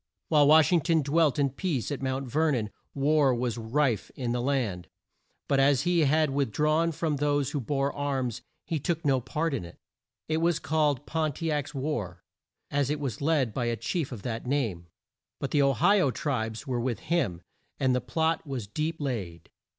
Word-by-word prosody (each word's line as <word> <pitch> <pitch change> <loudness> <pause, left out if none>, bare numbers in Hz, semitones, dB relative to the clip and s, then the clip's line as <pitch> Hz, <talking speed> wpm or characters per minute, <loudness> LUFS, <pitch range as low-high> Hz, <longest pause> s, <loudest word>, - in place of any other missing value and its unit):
While 150 -3 +5
Wash 155 +3 +6
ing 175 -2 +4
ton 160 +1 +2
dwelt 150 +1 +2
in 140 -2 +2
peace 145 - -2
at 140 - -3
Mount 130 0 -2
Ver 155 +5 +2
non, 110 -4 -2 0.2
war 140 -1 +3
was 120 -1 -2
rife 120 -1 0
in 125 -3 -2
the 120 0 0
land, 120 -10 -1 0.6
but 140 - +2
as 135 -1 +4
he 175 -3 +3
had 155 +1 +3
with 135 -4 0
drawn 155 +6 +2
from 155 -1 -1
those 145 -2 +1
who 145 - -2
bore 140 +3 -1
arms 135 -5 -2 0.2
he 165 -3 -2
took 165 +2 -2
no 135 -3 +3
part 150 +6 -2
in 130 - -2
it 85 - -11 0.5
It 155 - 0
was 170 0 +2
called 150 -4 0
Pon 155 -2 -1
ti 165 +3 -2
ac's 145 0 -2
war, 120 - -3 0.5
as 140 -1 +1
it 150 0 -1
was 135 -6 -4
led 140 -7 +1
by 120 0 -1
a 120 0 0
chief 135 +7 -2
of 115 -6 -7
that 115 0 -4
name, 110 -11 -1 0.5
but 140 - -3
the 145 - +3
O 140 0 +4
hi 200 - +4
o 165 - +3
tribes 120 -3 -3
were 125 -4 -1
with 120 -1 -2
him, 100 - -1 0.4
and 130 -1 +2
the 125 - +1
plot 160 0 0
was 130 -6 -4
deep 155 +10 -3
laid. 100 - -4
140 Hz, 200 wpm, -28 LUFS, 125-155 Hz, 0.6 s, Wash